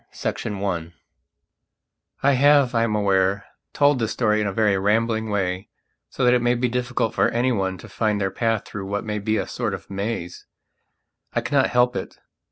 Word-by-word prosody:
PART - - -2
IV 105 -3 -4
I 85 -4 -2 1.3
I 140 - +5
HAVE, 140 -1 +4
I 115 - +2
am 110 -2 -1
aware, 100 -1 +1 0.3
told 145 -2 +3
this 115 -2 -1
story 110 -3 +1
in 105 - 0
a - - -1
very 105 0 +2
rambling 110 +3 +1
way 95 -1 -2 0.4
so 130 - -1
that 125 - +5
it 125 - +3
may 120 0 +2
be 125 +1 0
difficult 125 -1 -1
for - - +2
anyone 115 -6 0
to 115 - -12
find 105 0 -1
their 95 -1 -1
path 115 0 -1
through 95 -2 -7
what 100 +2 -3
may 105 -1 -2
be 110 +2 0
a - - -1
sort - - -3
of - - -12
maze. 100 -3 -4 0.9
I - - +1
cannot 140 -2 +2
help 125 0 +2
it. - - -5
110 Hz, 190 wpm, -23 LUFS, 100-120 Hz, 1.3 s, I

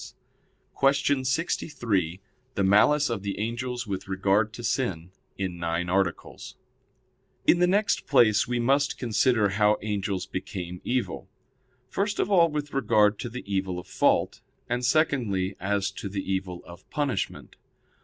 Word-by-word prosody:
_______________________ - - -10 0.6
QUESTION 140 0 +2
63 115 - -1 0.3
THE 100 - +1
MALICE 120 +9 +4
OF 110 -4 -2
THE 100 0 -4
ANGELS 120 +3 -3
WITH 95 -3 -5
REGARD 95 +2 +1
TO 120 - -9
SIN 90 -9 -2 0.3
(In 90 -3 -3
Nine 85 +1 -2
Articles) 95 -2 -2 0.9
In 175 - +5
the 180 - +4
next 200 +3 +1
place 120 -5 +4
we 120 0 -1
must 140 +4 +2
consider 110 -2 +2
how 105 +1 +3
angels 100 -3 -2
became 90 -1 -6
evil: 120 -7 -2 0.6
first 205 - -1
of 200 - 0
all 170 -4 +5
with 150 -1 -4
regard 105 -6 +3
to 120 - -4
the 125 +2 -7
evil 95 -2 -2
of 90 - -7
fault; - - +1 0.3
and 120 +1 -2
secondly, 120 - +1
as 100 +1 -1
to 100 +1 -6
the 95 0 -4
evil 95 -2 -4
of 85 +1 -14
punishment. 140 -9 -3
105 Hz, 145 wpm, -26 LUFS, 95-130 Hz, 0.9 s, In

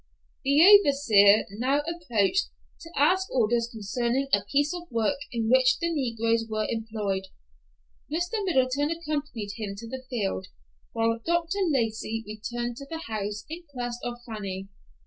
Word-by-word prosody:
The 285 +4 +5
overseer 275 - +6
now 270 +4 +2
approached 325 - 0 0.3
to 330 - -11
ask 370 +7 +3
orders 235 -1 +1
concerning 240 +5 -1
a - - +4
piece 290 +3 +2
of 350 -1 -7
work 235 +4 0
in 230 -2 -1
which 260 +2 +5
the 335 -1 -1
negroes 230 -5 0
were 215 -1 -1
employed. 215 -4 -2 0.9
Mr. 355 +7 -1
Middleton 285 -4 +1
accompanied 295 -10 -3
him 205 -3 -4
to 230 +3 -8
the 260 +2 -6
field, 195 - -2 0.5
while 230 0 +1
Dr. 345 +3 0
Lacey 225 -4 -1
returned 240 +3 -4
to 275 - -9
the 325 0 -5
house 210 -1 -4
in 330 +3 -7
quest 245 -2 -4
of 245 0 -3
Fanny. 195 -3 -5
245 Hz, 145 wpm, -27 LUFS, 220-295 Hz, 0.9 s, overseer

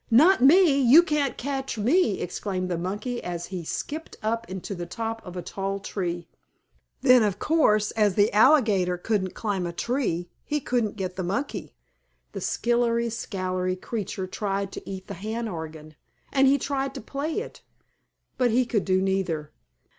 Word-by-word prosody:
"Not 305 +11 +6
me! 290 0 +6
You 270 +7 +8
can't 300 -5 0
catch 270 -2 -3
me!" 240 - +2
exclaimed 185 0 -3
the 175 - 0
monkey, 210 +7 -3
as 175 -1 -4
he 185 -3 -6
skipped 310 - -5
up 230 +2 -1
into 190 +1 -5
the 175 -2 -5
top 225 +4 -4
of 180 0 -8
a 175 - -4
tall 195 +3 -3
tree. 175 -3 -4 0.7
Then, 255 -2 +6
of 205 -3 +1
course, 215 -8 +2
as 210 -4 +2
the 205 0 +3
alligator 210 -7 +4
couldn't 190 -1 -1
climb 195 -5 -2
a - - -3
tree 175 -4 -1 0.2
he 295 - -1
couldn't 240 -6 -1
get 185 -2 -4
the 185 - -2
monkey. 200 +11 -3 0.6
The - - -6
skillery 235 0 +1
scallery 185 -4 -2
creature 200 -4 -4
tried 195 +1 -3
to - - -8
eat 190 -1 -6
the 200 - -7
hand 220 +5 -4
organ, 160 -4 -7 0.4
and 270 -1 +5
he 275 +1 +5
tried 275 0 -2
to - - -5
play 280 +7 -4
it, 480 - -8 0.8
but 250 -1 +4
he 245 +3 +3
could 225 -4 0
do 185 0 +2
neither. 175 -6 -1
210 Hz, 170 wpm, -26 LUFS, 185-250 Hz, 0.8 s, You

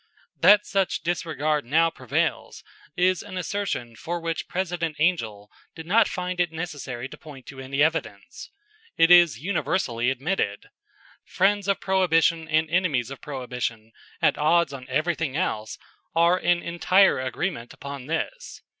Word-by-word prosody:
That 210 0 +6
such 195 -5 -1
disregard 155 -3 -1
now 165 +6 +2
prevails 150 +6 -2 0.3
is 185 0 +2
an 195 -2 -8
assertion 180 - -3
for 170 +7 -4
which 165 -1 -3
President 170 -4 -3
Angell 115 - -1 0.2
did 160 -1 -9
not 215 +5 +4
find 180 0 -4
it 175 -2 +1
necessary 145 -7 -5
to - - -13
point 140 -5 -12
to 135 - -10
any 135 +2 0
evidence. 155 -11 -3 0.5
It 165 +1 +5
is 175 -8 +7
universally 130 -7 -1
admitted. 135 - -2 0.5
Friends 200 +1 +1
of 200 - +1
Prohibition 165 -4 +2
and 155 +1 +2
enemies 155 -8 0
of 135 - -9
Prohibition, 125 -5 -5 0.3
at - - +3
odds 155 0 +3
on 130 -2 -9
everything 155 0 -1
else, 110 -11 -2 0.4
are 170 +2 +4
in 175 0 +1
entire 180 +1 +3
agreement 130 0 -3
upon 140 -2 -8
this. 485 - -4
160 Hz, 140 wpm, -25 LUFS, 135-180 Hz, 0.5 s, is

